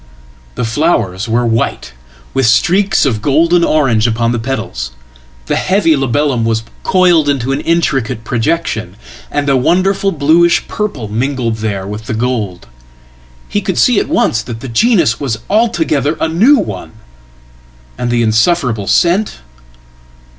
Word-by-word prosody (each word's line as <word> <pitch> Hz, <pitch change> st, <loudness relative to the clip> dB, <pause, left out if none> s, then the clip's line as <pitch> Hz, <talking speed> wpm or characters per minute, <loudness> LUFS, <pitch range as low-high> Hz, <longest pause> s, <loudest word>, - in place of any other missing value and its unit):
The 125 Hz, -, -2 dB
flowers 115 Hz, -, -1 dB
were 120 Hz, +2 st, +1 dB
white, 115 Hz, -, -2 dB, 0.4 s
with 135 Hz, -3 st, +1 dB
streaks 190 Hz, -, +2 dB
of 115 Hz, -6 st, -1 dB
golden 165 Hz, +7 st, +2 dB
orange 125 Hz, -9 st, +2 dB
upon 115 Hz, 0 st, 0 dB
the 120 Hz, -, -1 dB
petals; 110 Hz, -, -4 dB, 0.5 s
theheavy 185 Hz, -, +1 dB
labellum 135 Hz, -2 st, 0 dB
was 115 Hz, 0 st, 0 dB, 0.2 s
coiled 175 Hz, -5 st, +3 dB
into 135 Hz, -2 st, -1 dB
an 135 Hz, -, -1 dB
intricate 135 Hz, -9 st, -1 dB
projection, 115 Hz, -, -2 dB, 0.3 s
and 145 Hz, 0 st, -2 dB
a 135 Hz, -, +3 dB
wonderfulbluish 170 Hz, +1 st, +2 dB
purple 195 Hz, -, -4 dB
mingled 120 Hz, +1 st, -2 dB
there 105 Hz, -3 st, -3 dB
with 105 Hz, +2 st, -7 dB
the 110 Hz, -, -2 dB
gold. 110 Hz, -6 st, -3 dB, 0.8 s
He 205 Hz, -, -2 dB
could 190 Hz, -1 st, -3 dB
see 245 Hz, -4 st, +4 dB
at -, -, -3 dB
once 240 Hz, -, +1 dB
that 115 Hz, -1 st, -8 dB
thegenus 135 Hz, -, +1 dB
was 125 Hz, -6 st, -2 dB
altogether 165 Hz, -9 st, +1 dB
a -, -, +1 dB
new 215 Hz, -, +4 dB
one. 100 Hz, -, -5 dB, 1.0 s
And 125 Hz, 0 st, -3 dB
the 120 Hz, -1 st, +1 dB
insufferable 115 Hz, -, +1 dB
scent! 185 Hz, +5 st, +1 dB
135 Hz, 130 wpm, -14 LUFS, 115-170 Hz, 1.0 s, see